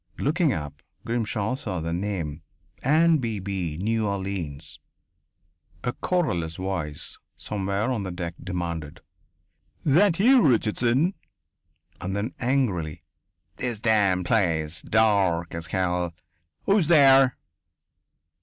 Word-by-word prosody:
Looking 155 +2 +1
up, 75 - -5 0.2
Grimshaw 115 -1 -1
saw 110 - -4
the 85 +1 -3
name: 85 -5 -3 0.4
"Anne 160 +3 +4
Beebe, 95 - -3
New 110 +3 0
Orleans." 95 -7 -4 1.0
A 120 - -1
querulous 90 - -1
voice, 90 -6 -4 0.2
somewhere 100 +3 -2
on 120 -5 -1
the 95 - -4
deck, 90 -2 -4
demanded: 85 -3 -4 0.8
"That 170 +5 +4
you, 250 +5 +6
Richardson?" 125 - +2 0.9
And 95 +1 -3
then, 105 +5 -2
angrily: 115 - -1 0.5
"This 120 -4 -3
damned 100 -5 +2
place 80 -6 +1
dark 100 -6 +2
as 85 0 -6
hell.... 90 -3 -1 0.5
Who's 195 -5 +3
there?" 135 -5 +6
100 Hz, 105 wpm, -25 LUFS, 85-125 Hz, 1.0 s, you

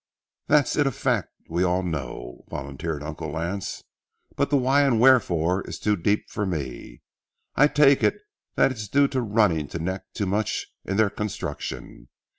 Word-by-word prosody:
"That 150 0 +6
it's 140 - -3
a 145 -2 +3
fact, - - -1 0.2
we 85 +2 0
all 90 +1 +1
know," 65 -7 -5
volunteered 70 +2 -5
Uncle 80 +1 -5
Lance, 85 +5 -4 0.5
"but 140 0 0
the 145 - +3
why 135 +2 +3
and 135 -5 +3
wherefore 95 -8 +4
is - - -5
too 105 -1 +1
deep 100 +3 0
for 105 - -3
me. 75 -9 -5 0.5
I 145 - +6
take 145 -2 +4
it - - +3 0.4
that - - +4
it's 110 -4 -6
due 140 +6 +4
to 130 -2 -1
running 105 -9 +2
to - - -5
neck 95 +3 -3
too 100 - -1
much 100 +3 -1 0.2
in 100 - -2
their 110 -3 +3
construction. 100 - -5
100 Hz, 170 wpm, -25 LUFS, 80-125 Hz, 0.5 s, That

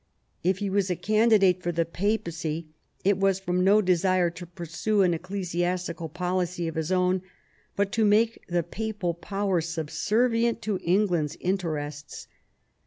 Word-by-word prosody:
If 185 +2 +2
he 205 0 -2
was 195 -1 +1
a 180 - +1
candidate 205 -1 +3
for 175 - -1
the 165 0 0
Papacy, 170 -4 -2 0.4
it 195 0 +2
was 195 -1 +2
jl/ - - -25
from 180 0 +1
no 205 +3 +5
desire 185 -1 +2
to 175 +1 -9
pursue 175 +5 -1
an 180 -2 +3
ecclesiastical 175 -1 -3
policy 180 0 -2
of 165 - -3
his 160 0 -2
it 185 - +2
own, 180 0 +2 0.5
but 200 0 0
to 225 -2 +1
make 220 +2 +3
the 175 -1 0
papal 210 -3 -3
power 195 +1 -1
subservient 220 +9 0
to 210 -4 -1
England's 175 -4 +1
interests. 150 -6 -3
180 Hz, 155 wpm, -26 LUFS, 170-200 Hz, 0.5 s, no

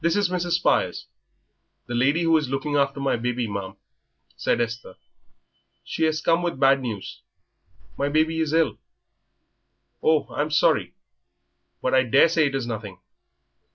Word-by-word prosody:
"This 170 0 +2
is 205 -3 +1
Mrs. 175 -1 -1
Spires, 175 - +1 0.8
the 120 - -6
lady 140 +8 +2
who 165 -1 +3
is 150 -4 +1
looking 145 +2 -2
after 140 0 +1
my 135 -3 0
baby, 120 0 -2
ma'am," 100 -2 -5 0.6
said 70 - 0
Esther; 115 -4 -4 0.9
"she 160 - -1
has 155 0 0
come 165 +1 +2
with 175 -6 -3
bad 135 0 +4
news 110 -6 -6 0.8
my 140 - 0
baby 160 +2 +1
is 160 -2 0
ill." 165 0 +1 1.2
"Oh, 155 -1 +2
I'm 150 +1 -1
sorry. 150 -1 +2 0.9
But 130 - 0
I 130 - +5
daresay 150 +5 +4
it 140 - -3
is 135 -3 -2
nothing." 110 -5 -6
140 Hz, 150 wpm, -24 LUFS, 120-160 Hz, 1.2 s, I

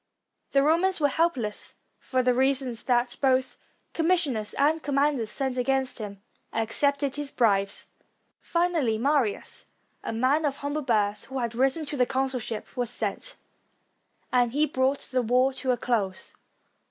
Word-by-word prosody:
The 275 0 +5
Romans 340 +5 +2
were 290 -2 +3
helpless, 265 -10 -1 0.2
for 255 -1 0
the 250 0 +3
reason 265 0 +1
that 245 -1 +1
both 260 -1 +2 0.4
com 325 -1 0
missioners 280 - +1
and 310 +3 +2
commanders 280 -5 +1
sent 265 +1 -1
against 265 0 0
him 200 -2 -7 0.3
accepted 280 +5 0
his 290 -1 -3
bribes. 200 -6 +1 0.5
Finally, 335 -10 +1
Marius, 265 -3 0 0.4
a - - -3
man 260 +7 +2
of 285 -2 0
humble 285 +2 -3
birth, 210 -6 0
who 265 - -6
had 235 -2 -2
risen 270 +6 +1
to 290 0 -5
the 250 -1 +3
consulship, 260 -4 -2
was 245 -2 -1
sent, - - -3 1.0
and 245 -2 +3
he 300 +2 +3
brought 270 -1 0
the 255 -1 +2
war 250 +3 +2
to 260 0 -4
a 250 - +3
close. 210 -6 -1
260 Hz, 150 wpm, -27 LUFS, 235-285 Hz, 1.0 s, The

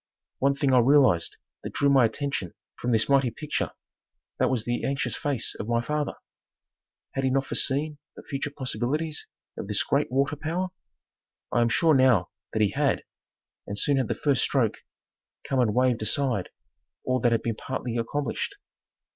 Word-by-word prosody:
One 140 +1 +3
thing 140 -1 +1
I 125 - +7
realized 125 - +4 0.2
that - - -7
drew 145 - +2
my 135 -3 +6
attention 135 - -3 0.2
from 125 - -1
this 110 -1 +3
mighty 135 -2 +4
picture, 150 +6 -3 0.7
that - - +3
was 120 -4 -1
the 120 0 -1
anxious 135 -4 -1
face 140 -5 -2
of 105 - -6
my 115 0 +2
father. 150 +4 -2 1.0
Had 135 - -2
he 130 - +3
not 135 +1 +1
foreseen 145 +2 0 0.2
the - - -11
future 140 +1 -3
possibilities 145 +3 -3 0.3
of - - -5
this - - +1
great - - 0
water 140 +3 +1
power? 170 +5 -2 0.8
I 120 - +3
am 120 - +3
sure 160 +6 +4
now 130 - +4 0.2
that 110 - +2
he 100 - +2
had, - - +1 0.6
and 100 - -4
soon 140 +5 +2
had 130 -4 +1
the - - -1
first 140 -6 +1
stroke - - +1 0.7
come 135 - -1
and 110 -4 +2
waived 125 -2 +2
aside 120 -3 0 0.5
all 130 0 +1
that 120 0 +2
had 115 - +1
been 115 - 0
partly 125 0 -4
accomplished. 120 +4 -2
130 Hz, 170 wpm, -26 LUFS, 115-140 Hz, 1.0 s, I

